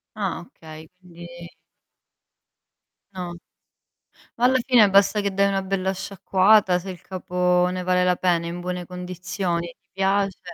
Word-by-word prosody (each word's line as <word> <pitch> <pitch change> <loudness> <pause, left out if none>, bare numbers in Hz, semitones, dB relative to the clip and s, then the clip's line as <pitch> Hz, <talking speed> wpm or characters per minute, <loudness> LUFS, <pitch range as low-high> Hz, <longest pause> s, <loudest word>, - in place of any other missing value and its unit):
Ah, 195 -5 -3
okay. 160 -2 -13
Quindi 175 -2 -13 1.9
No. 175 -2 -6 1.0
Ma 240 - +1
alla 260 +1 +4
fine 235 -6 +5
basta 200 +2 +3
che 200 -1 -1
dai 200 +1 +2
una 195 -1 0
bella 190 0 -2
sciacquata, 190 0 +2
se 190 +2 -9
il 180 - -8
capo 180 -1 0
ne 185 0 -4
vale 180 0 +2
la 180 0 +2
pena, 175 -2 0
è - - -4
in 175 +1 -6
buone 180 -1 -5
condizioni 180 -1 -4
e - - -13
ti - - -50
piace 195 0 0
185 Hz, 155 wpm, -23 LUFS, 180-195 Hz, 1.9 s, fine